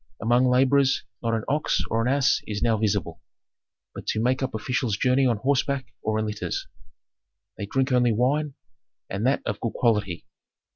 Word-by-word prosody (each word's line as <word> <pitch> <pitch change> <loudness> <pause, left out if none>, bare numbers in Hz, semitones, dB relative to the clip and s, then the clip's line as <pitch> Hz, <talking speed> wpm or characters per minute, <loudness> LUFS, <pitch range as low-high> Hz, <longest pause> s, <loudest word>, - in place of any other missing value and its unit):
Among 120 +3 +3
laborers 135 +2 +3 0.2
not 115 -1 0
an 110 - -2
ox 150 +2 0
or 115 - +1
an 120 +3 +1
ass 140 -1 +2
is 105 -1 -3
now 115 -2 +3
visible, 100 -6 -1 0.7
but - - -9
to - - 0
make 125 +4 +1
up 130 -3 -2
officials 115 -1 -1
journey 130 +2 +3
on 120 -3 +1
horseback 140 +3 -1
or 110 0 -1
in 110 - 0
litters. 105 -1 -3 0.9
They 100 - -4
drink 135 +4 0
only 125 -1 +3
wine, 135 +6 0 0.6
and 100 +5 -1
that 135 - +1
of 105 -3 -3
good 115 - -3
quality." 105 -7 0
120 Hz, 175 wpm, -25 LUFS, 110-135 Hz, 0.9 s, Among